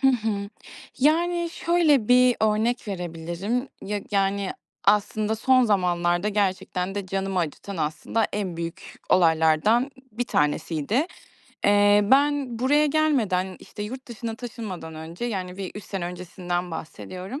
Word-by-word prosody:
Hı 270 - +4
hı. 215 -5 0 0.5
Yani, 340 +4 +2
şöyle 320 -11 +2
bir 250 0 +6
örnek 220 +2 +1
verebilirim. 180 +7 -3
Ya, 205 +1 -3
yani, 195 -1 +1 0.3
aslında 210 +1 +2
son 255 +3 +4
zamanlarda 175 -2 +1
gerçekten 195 -2 -1
de 200 -2 -3
canımı 195 0 -2
acıtan 175 +4 -3
aslında 160 +8 -1
en 195 -5 -3
büyük 170 0 -7
olaylardan 165 - +4 0.2
bir 240 +3 -2
tanesiydi. 160 - 0 0.6
Eee, 205 0 +5
ben 280 -3 +3
buraya 290 +5 +3
gelmeden, 230 - +1
işte, 210 - -9
yurt 260 +5 -6
dışına 230 -1 -5
taşınmadan 215 -9 -7
önce, 160 +7 -7
yani, 185 -6 -3
bir 195 -1 -5
3 205 - -8
sene 195 -3 -4
öncesinden 180 0 -4
bahsediyorum. 185 - -7
205 Hz, 130 wpm, -25 LUFS, 180-245 Hz, 0.6 s, bir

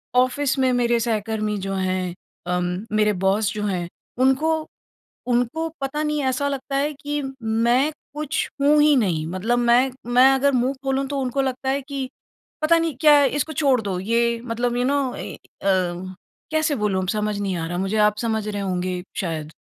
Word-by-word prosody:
Office 260 +2 +2
में 260 -1 +3
मेरे 240 -1 +2
सहकर्मी 215 -2 -1
जो 195 0 -4
हैं 185 -1 -1 0.3
अम, 180 +2 -1
मेरे 210 0 +3
बॉस 200 +1 +2
जो 210 - -4
हैं, 180 -4 -2 0.3
उनको 310 +5 +2 0.6
उनको 245 +7 0
पता 275 +3 -2
नहीं 300 -1 0
ऐसा 260 +2 0
लगता 275 0 -3
है 285 +2 +1
कि 290 0 -2 0.2
मैं 235 +6 +2 0.2
कुछ 300 +1 -2
हूँ 295 +1 +5
ही 300 -1 +5
नहीं। 175 -10 +1
मतलब 210 +8 0
मैं 245 +2 +4 0.2
मैं 255 +2 +7
अगर 280 +1 +3
मुँह 255 +1 +1
खोलूँ, 270 0 0
तो 280 0 -2
उनको 260 +2 0
लगता 265 0 -2
है 275 +1 0
कि 270 -1 -5 0.5
पता 320 +2 +4
नहीं 330 -4 -1
क्या, 295 -2 +7
इसको 290 +3 0
छोड़ 270 -4 +3
दो 195 -3 -3
ये 235 +3 +1
मतलब 240 +1 -1
यू 245 - +1
नो 275 -1 +1
ए, - - -6
अ, 195 - -6 0.8
कैसे 315 -1 +1
बोलूँ 210 -5 0
अब 185 - -4
समझ 210 -1 -1
नहीं 195 -2 -1
आ 165 - -3
रहा 175 +1 -3
मुझे 195 +3 -1
आप 210 0 +3
समझ 220 -1 -1
रहे 205 -1 -3
होंगे 180 -1 -2 0.2
शायद। 160 -4 -3
245 Hz, 185 wpm, -23 LUFS, 205-275 Hz, 0.8 s, मैं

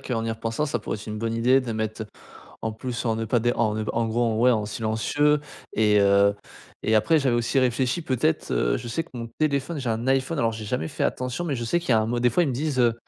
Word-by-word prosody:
qu'en 115 -3 -3
y 115 - -1
repensant, 115 +6 -2
ça - - -1
pourrait - - -4
être 105 - -11
une 105 0 -5
bonne 115 0 -2
idée 125 +3 +4
de 120 -3 -4
mettre 110 0 -3 0.6
en 110 - -2
plus 120 +2 -5
en 115 - +1
ne 115 - -2
pas 120 +2 +1
dé 120 +2 +1
en 110 -2 +1
ne 110 0 -2
pas - - -3
en 115 0 +1
gros, 115 -1 0
ouais, 125 +2 +5
en 110 -3 0
silencieux 115 +8 +1 0.3
et 105 -1 +3
heu 100 0 +4 0.5
et 110 - +2
après 135 +10 +4
j'avais 130 -4 +1
aussi 120 +3 0
réfléchi, 130 +5 +1
peut-être, 155 +4 0
heu, - - +1
je 120 0 -7
sais 165 +8 -2
que 165 - -23
mon 120 -2 -5
téléphone 150 +1 0
j'ai 125 - -3
un 115 +2 -2
iPhone. 135 +4 +1
Alors 115 -3 +2
j'ai 110 0 -6
jamais 80 -5 -2
fait - - -3
attention, 125 +6 -2
mais 150 -5 -1
je 120 - -4
sais 175 +10 +1
qu'il 170 - -9
y - - +5
a 110 - +5
un 110 - 0
mode 120 +1 -1
des 125 - +5
fois 175 +10 +2
ils 145 - 0
me - - -2
disent, 140 0 -1
heu 120 -2 +4
120 Hz, 280 wpm, -25 LUFS, 110-135 Hz, 0.6 s, ouais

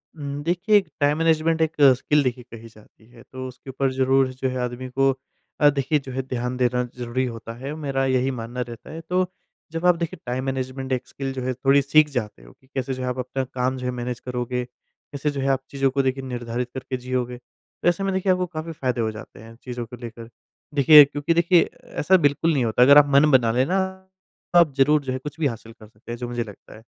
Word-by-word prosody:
हुँ, 150 - -9
हुँ। 145 - -6
देखिए, 180 +6 +3
एक 190 -4 0
time 145 0 +2
management 165 0 +2
एक 160 -1 +2 0.3
स्किल 150 +3 +2
देखिए 125 -1 -2
कही 115 0 -10
जाती 110 0 -21
है, 120 -1 -16
तो 130 0 -8
उसके 130 +1 -12
ऊपर 135 0 -1
ज़रूर 135 0 +3
जो 130 +1 -2
है 130 - -4
आदमी 125 +1 -5
को 135 +1 +2 0.5
अ, 145 - +7
देखिए 145 +2 0
जो 135 -1 -9
है 130 +1 -2
ध्यान 125 -1 -4
देना 125 0 +1
ज़रूरी 125 +1 -2
होता 115 -1 -7
है। 135 +4 -5
मेरा 135 -3 -1
यही 130 0 +1
मानना 120 0 -5
रहता 120 -2 -8
है, 165 - -7
तो 180 +2 -1 0.4
जब 165 +2 -4
आप 180 -1 +6
देखिए 170 +1 -4
टाइम 125 +1 -2
मैनेजमेंट 130 0 -4
एक 125 0 -3
स्किल 135 -1 -5
जो 130 - -5
है 130 - -1
थोड़ी 135 +3 +3
सीख 150 +2 +4
जाते 105 - -4
हो - - -15
कि 130 - -29
कैसे 130 -1 -3
जो 130 - -6
है - - -2
आप 125 - -3
अपना 130 +1 -3
काम 130 +1 -1
जो 125 - -6
है 125 - 0
मैनेज 125 -1 -4
करोगे, 125 0 -3
कैसे 140 +3 -7
जो 140 - -4
है 135 - -1
आप 135 -1 +1
चीज़ों 135 -1 +1
को 140 +1 +1
देखिए 135 0 -1
निर्धारित 120 -1 -4
करके 130 0 -4
जियोगे। 125 -1 -3
तो 125 - -9
ऐसे 175 +3 -1
में 195 -1 0
देखिए 190 0 +1
आपको 180 0 +1
काफ़ी 165 -1 -6
फ़ायदे 130 -6 -2
हो 110 - 0
जाते 110 -2 -11
हैं 115 +2 -13
चीज़ों 120 -2 -5
को 115 - -10
लेकर, 115 -1 -9 0.4
देखिए 150 +1 +9
क्योंकि 145 +3 -1
देखिए 170 0 +4
ऐसा 190 +5 +2
बिल्कुल 160 +3 0
नहीं 130 -5 +1
होता, 115 +2 +1
अगर 140 +3 +8
आप 145 - +8
मन 145 +2 +6
बना 120 -4 +4
लेना 130 +11 +1 0.7
तो 175 - +7
आप 160 -5 +4
ज़रूर 145 +2 +4
जो 130 - -3
है - - -2
कुछ 150 +4 -8
भी 155 - +2
हासिल 115 -2 -7
कर 110 -2 -16
सकते 110 +2 -13
हैं 120 - -4
जो 120 0 -5
मुझे 120 -1 -2
लगता 105 -3 -13
है, 110 - -14
130 Hz, 245 wpm, -23 LUFS, 125-145 Hz, 0.7 s, देखिए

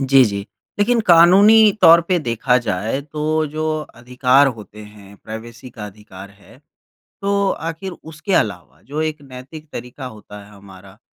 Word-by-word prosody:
जी, 135 -1 +5
जी, 100 -1 -4 0.3
लेकिन 230 +3 +2
कानूनी 200 +6 +6
तौर 170 +1 +8
पे 180 -1 +2
देखा 125 -2 0
जाए, 110 +2 -3
तो 155 +1 -2
जो 155 +1 -3 0.2
अधिकार 125 +3 +2
होते 105 0 -13
हैं, 100 -1 -16
प्राइवेसी 115 +3 -10
का 105 -2 -9
अधिकार 100 -1 -13
है, 100 0 -20 0.6
तो 200 0 0 0.2
आखिर 175 +3 -6
उसके 160 +3 -8
अलावा 105 - -2
जो 150 - -3
एक 155 -2 -4
नैतिक 135 +4 -12
तरीका 125 +2 -8
होता 105 0 -13
है 105 - -18
हमारा 100 0 -16
130 Hz, 150 wpm, -19 LUFS, 105-160 Hz, 0.6 s, तौर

